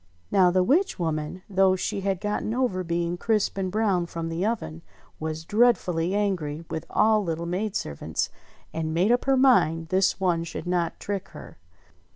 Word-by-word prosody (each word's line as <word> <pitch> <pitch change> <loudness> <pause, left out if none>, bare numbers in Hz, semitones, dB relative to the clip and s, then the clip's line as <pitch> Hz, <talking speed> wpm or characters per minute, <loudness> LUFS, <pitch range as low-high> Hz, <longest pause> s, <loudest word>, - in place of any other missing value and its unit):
Now 185 -2 +5
the 185 +1 +3
witch 330 - +2
woman, 160 +1 -3
though 190 -1 +3
she 195 +1 -3
had 195 -2 -1
got 210 +1 -2
over 220 -5 -1
being 170 0 -1
crisp 215 +2 0
and 185 -1 -2
brown 195 -5 +1
from 165 -1 -5
the 165 +2 -2
oven, 210 -7 -2 0.4
was 160 0 -4
dreadfully 195 -6 +2
angry 170 -7 -1
with 160 - -4
all 215 -1 +3
little 165 -1 -3
maid 190 +4 -2
servants, 75 - -3 0.4
and 160 0 -2
made 185 +7 +3
up 245 - +2
her 270 -1 +3
mind 165 - +3
this 190 +1 +2
one 175 -3 +1
should 170 0 -6
not 175 -2 -1
trick 200 -1 -4
her. - - -12
185 Hz, 175 wpm, -25 LUFS, 165-210 Hz, 0.4 s, Now